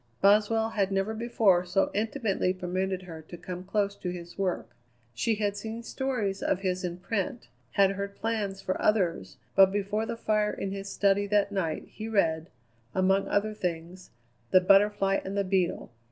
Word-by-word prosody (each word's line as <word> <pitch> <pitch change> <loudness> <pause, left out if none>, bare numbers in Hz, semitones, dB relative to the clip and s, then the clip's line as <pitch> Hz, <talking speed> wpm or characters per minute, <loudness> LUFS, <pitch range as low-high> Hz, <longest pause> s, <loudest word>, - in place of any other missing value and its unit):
Boswell 215 +3 +4
had 200 -3 0
never 195 +3 0
before 220 -5 +3
so 180 +2 +1
intimately 210 -4 0
permitted 185 +1 -2
her 165 -3 -9
to 165 +3 -11
come 180 +1 -7
close 200 +1 0
to 180 - -5
his 175 -1 -7
work. 190 -2 -2 0.4
She 220 - 0
had 205 -1 -1
seen 225 +2 -6
stories 230 -7 -2
of 185 - 0
his 185 -1 -1
in 175 -1 -3
print, 200 +4 -3 0.2
had 195 -1 +4
heard 200 0 -4
plans 205 -4 -2
for 185 - -2
others, 175 - +1 0.2
but 190 -1 +7
before 205 +2 -1
the 230 - -4
fire 215 -2 +1
in 195 - -4
his 195 0 -5
study 200 0 +2
that 205 0 +2
night 175 -6 -2
he 220 - -7
read, 165 -6 +1 0.5
among 190 +1 +2
other 215 +1 0
things, 180 -1 -5 0.4
"The 185 - +7
Butterfly 195 +1 +4
and 195 +1 -4
the 200 - +2
Beetle." 185 - 0
195 Hz, 170 wpm, -28 LUFS, 185-210 Hz, 0.5 s, but